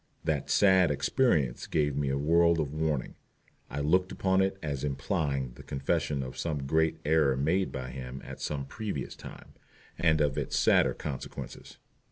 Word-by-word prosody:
That 75 -4 -1
"sad 95 -3 +5
experience" 75 - +1
gave 75 -2 +1
me 70 -1 0
a 70 - 0
world 85 +3 +3
of 75 -2 -2
warning. 75 -4 -1 0.6
I 70 - -3
looked 90 +6 +2
upon 95 0 +2
it 95 0 0
as 70 -3 -3
implying 70 - -1
the - - -13
confession 70 +1 -1
of 65 - -7
some 75 -4 -2
great 80 +3 +2
error 75 -4 +3
made 85 +8 +1
by 65 -2 -5
him 65 0 -7
at - - -9
some 70 -2 -3
previous 100 - -5
time, - - -12 0.5
and 80 -2 +3
of 75 -3 +1
its - - -2
sadder - - +4
consequences. 70 -4 -7
75 Hz, 165 wpm, -29 LUFS, 70-85 Hz, 0.6 s, sad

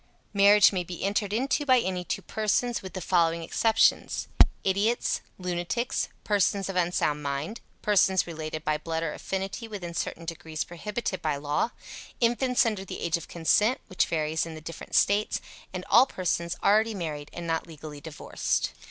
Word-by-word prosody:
Marriage 200 +1 +7
may 180 -2 0
be 175 -1 -7
entered 200 +1 0
into 265 +6 +1
by 260 -3 +5
any 185 -4 -2
two - - -3
persons, 225 +3 0
with 190 -2 -8
the 185 - -5
following 170 -2 +2
exceptions: 225 +6 +2 0.4
Idiots, 200 +5 +1 0.2
lunatics, 180 +6 -2
persons 200 -1 +1
of 195 - -4
unsound 170 -4 +1
mind, 145 +10 -3 0.2
persons 190 -3 +4
related 155 -2 -5
by 150 0 +1
blood 165 +1 -3
or 150 -2 -2
affinity 195 +4 -4
within 190 -6 -6
certain 170 0 -3
degrees 160 -1 -4
prohibited 200 +3 -4
by 155 -2 0
law, 145 +9 0 0.5
infants 245 +1 +3
under 215 -4 -1
the 195 - -7
age 170 -2 0
of 170 - -5
consent, 205 - +2
which 185 - +1
varies 155 -1 0
in 160 - -7
the - - -7
different 165 +2 -7
States, 205 +1 +3 0.3
and 185 0 -5
all 240 +6 +6
persons 170 -4 -1
already 220 +2 +4
married 155 -5 -4
and 170 - -7
not 165 0 -1
legally 150 -2 -9
divorced. 155 0 -2
180 Hz, 165 wpm, -27 LUFS, 165-210 Hz, 0.5 s, Marriage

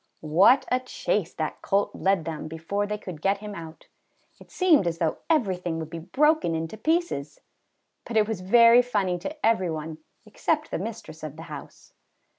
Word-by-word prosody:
What 245 - +6
a 255 - +3
chase 210 -7 -2
that 155 -1 -4
colt 200 +1 +1
led 190 -4 +1
them 160 -2 -5
before 165 +6 -3
they 210 0 -3
could 180 -7 -9
get 195 +2 +2
him 210 0 -8
out! 165 -3 -10 0.5
It - - -16
seemed 330 - +3
as 165 -1 -1
though 165 -2 -1
everything 185 - 0
would 160 -1 -6
be 170 - -5
broken 285 - +2
into 160 +5 -4
pieces; 310 - -1 0.7
but 230 - -1
it 210 -1 +4
was 220 -5 -3
very 230 +5 +7
funny 200 -7 -1
to 295 - -5
every 220 -6 +2
one 160 0 -5 0.3
except 305 +8 -1
the - - -2
mistress 195 -6 -7
of 155 -2 -7
the 160 - -9
house. 145 - -11
195 Hz, 180 wpm, -26 LUFS, 165-230 Hz, 0.7 s, very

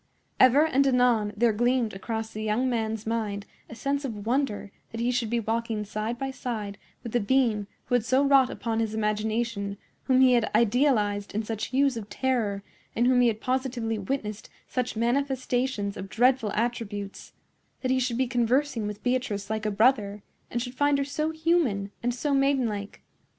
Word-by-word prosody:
Ever 265 +4 +6
and 275 -3 +2
anon 245 -5 +3
there 230 0 +3
gleamed 240 0 +1
across 220 +3 -4
the 215 - -6
young 220 +4 0
man's 220 -3 -2
mind 215 -3 -2 0.2
a - - -8
sense 280 +4 -1
of 215 -6 -5
wonder 235 -5 -1 0.2
that 225 - -7
he 240 +2 +1
should 240 -3 -1
be 235 +1 +1
walking 225 -1 -2
side 215 +3 -3
by 270 +2 -3
side 215 -6 -5 0.2
with 235 - -6
the 240 - +2
being 220 -2 +1 0.2
who - - -4
had 245 -3 +3
so 260 +4 +2
wrought 275 -2 +5
upon 225 -1 -2
his 220 -1 -1
imagination, 215 -1 -1 0.3
whom 260 -1 +4
he 255 -1 +6
had 235 -2 +2
idealized 215 -4 +2
in 220 - 0
such 220 0 -3
hues 270 -1 +2
of 210 -2 -7
terror, 225 -7 -1 0.3
in 240 - +2
whom 250 0 +4
he 245 - +5
had 220 -1 -1
positively 250 -4 -1
witnessed 210 -1 -4 0.2
such 250 -2 -2
manifestations 250 -3 0
of 195 - -7
dreadful 245 -1 +2
attributes,—that 225 +2 -5
he 260 - +3
should 245 -2 -1
be 260 - +2
conversing 245 -1 +1
with 210 0 -7
Beatrice 245 -5 -1
like 220 0 -1
a - - +2
brother, 210 -2 +2 0.3
and 240 - -2
should 245 -1 -7
find 285 +2 +2
her 280 - 0
so 305 +2 -2
human 315 - +1
and 245 - 0
so 280 +4 -1
maidenlike. 255 -7 0
235 Hz, 180 wpm, -27 LUFS, 215-260 Hz, 0.3 s, Ever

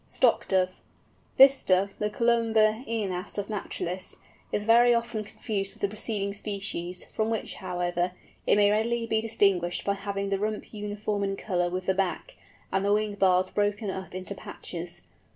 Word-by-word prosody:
STOCK - - +2
DOVE. 185 -1 +2 0.7
This 270 0 +8
Dove, 190 +1 +2
the 210 - 0
Columba 225 0 +3
ænas 205 -5 -3
of 205 +1 -3
naturalists, 185 -3 -4 0.4
is 205 - -1
very 235 +2 +6
often 235 -2 -1
confused 205 -2 -4
with - - -17
the 200 - +3
preceding 205 -1 -2
species, 195 -4 -4
from 220 0 -2
which, 225 -1 -2
however, 180 -1 -2 0.3
it - - +6
may 205 0 +5
readily 230 +2 +1
be 220 -1 +1
distinguished 195 -6 +1
by 200 - +2
having 200 0 -3
the 195 -1 0
rump 215 +2 -3
uniform 210 0 -2
in 195 0 -1
colour 175 -3 -1
with 185 +1 -3
the 190 - +2
back, 195 - -2 0.4
and 195 - +1
the 200 - +2
wing 210 0 +1
bars 185 -2 +3
broken 205 0 0
up 190 -1 -7
into 185 +2 -4
patches. 175 -2 -8
200 Hz, 170 wpm, -28 LUFS, 185-215 Hz, 0.7 s, This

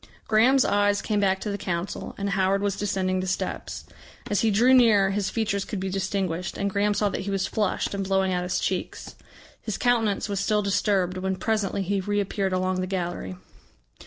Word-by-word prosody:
Graham's 240 +5 +4
eyes 205 0 +2
came 210 -2 -1
back 190 -1 +2
to 210 - -3
the 200 - -4
Council, 175 0 -4
and 200 0 -2
Howard 195 +1 +1
was 200 -1 0
descending 185 -2 -1
the 185 - -3
steps. 185 - -3 0.5
As 205 - +2
he 225 - +3
drew 235 +5 +4
nearer 215 -6 +5
his 200 0 -1
features 210 -3 -1
could 205 - -5
be 190 0 -3
distinguished, 190 -2 -2
and 200 0 -1
Graham 205 0 +1
saw 205 0 +1
that - - -3
he 195 - -5
was 195 -1 0
flushed 210 -2 -1
and 200 0 -2
blowing 190 -1 +1
out 180 - 0
his 180 0 -1
cheeks. - - -3 0.5
His 215 - -4
countenance 225 -5 +1
was 200 -2 -2
still 210 +1 +1
disturbed 195 -2 +1
when 190 0 -1
presently 200 0 -1
he 195 +1 -1
reappeared 200 0 -1
along 185 0 0
the 185 - -2
gallery. 175 - -3
200 Hz, 195 wpm, -25 LUFS, 185-205 Hz, 0.5 s, nearer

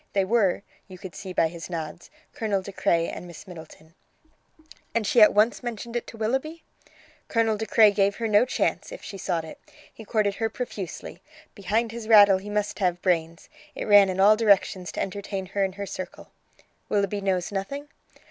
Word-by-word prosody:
They 195 -1 +2
were, 200 -3 +1 0.2
you 185 -2 -11
could 185 -1 -9
see 190 - -8
by 165 -2 +2
his 170 +1 -9
nods, 165 0 -6 0.2
Colonel 205 -4 -1
De 200 - -8
Craye 170 -3 +1
and 180 - -7
Miss 175 +3 -12
Middleton." 160 -2 -13 1.0
"And 230 -2 +1
she 230 +3 +4
at 210 - +8
once 215 +3 +2
mentioned 235 -1 -6
it 240 - -3
to 230 - -10
Willoughby?" 265 +9 -2 0.6
"Colonel 225 -2 +1
De 220 +1 -4
Craye 215 -2 +6
gave 200 0 +1
her 230 - -2
no 210 0 +5
chance, 255 - -1
if - - -9
she 195 -2 -8
sought 170 -4 -2
it. 160 - -11 0.3
He 225 - -11
courted 210 -2 0
her 225 -1 -1
profusely. 215 -5 -7 0.3
Behind 220 +3 -1
his 230 -1 -7
rattle 205 -4 +7
he 200 +2 -9
must 210 0 -2
have 180 -3 0
brains. 165 -2 -1 0.3
It - - -4
ran 205 -2 +6
in 185 0 -3
all 205 +2 +7
directions 200 -5 +2
to - - -5
entertain 195 0 -4
her 195 +2 -1
and 190 -1 -2
her 200 0 -5
circle." 185 -1 -8 0.6
"Willoughby 200 0 0
knows 185 -2 -1
nothing?" 275 +9 -4
200 Hz, 190 wpm, -25 LUFS, 185-220 Hz, 1.0 s, at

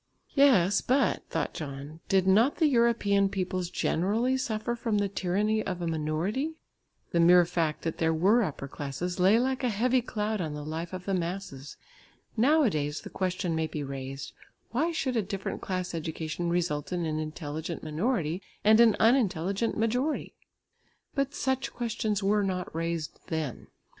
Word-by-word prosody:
"Yes, 205 - +5
but," 270 +2 +1
thought - - -2
John, 145 0 -7
"did 190 -1 +3
not 220 +9 +4
the 325 - +2
European 235 -7 +3
peoples 185 -2 -2
generally 215 +11 +1
suffer 235 -3 -2
from 230 -3 -1
the 205 0 +1
tyranny 200 +3 0
of 185 -2 -3
a 175 - -3
minority?" 165 - -1 0.6
The 170 - +1
mere 175 +1 +7
fact 165 -3 -1
that 165 - -3
there 160 -1 +2
were 190 +9 +4
upper 145 -8 -3
classes 145 +6 -4
lay 190 +5 +5
like 260 +2 0
a 250 - +2
heavy 245 +4 +2
cloud 215 -3 -2
on 155 -3 -3
the 150 0 -6
life 160 +2 -4
of 185 -1 -6
the 195 - -1
masses. 170 -6 -4 0.6
Nowadays 220 - +2
the - - -10
question 180 -2 -1
may 160 0 0
be 150 -2 -4
raised, 135 0 -6 0.4
"Why 305 +9 +1
should 270 -6 -1
a 225 - +3
different 195 0 -4
class 185 -2 -3
education 160 +1 -3
result 170 -4 -1
in 175 -2 -1
an 155 -1 -1
intelligent 155 +1 -5
minority 165 - -1 0.2
and 215 +1 +6
an 230 -3 +6
unintelligent 215 -3 +2
majority?" 250 +7 0 0.8
But 275 0 -1
such 265 0 -1
questions 220 -4 -2
were 205 +1 +3
not 185 -3 -3
raised 165 -1 -3
then. 155 -6 -3
185 Hz, 160 wpm, -28 LUFS, 160-225 Hz, 0.8 s, mere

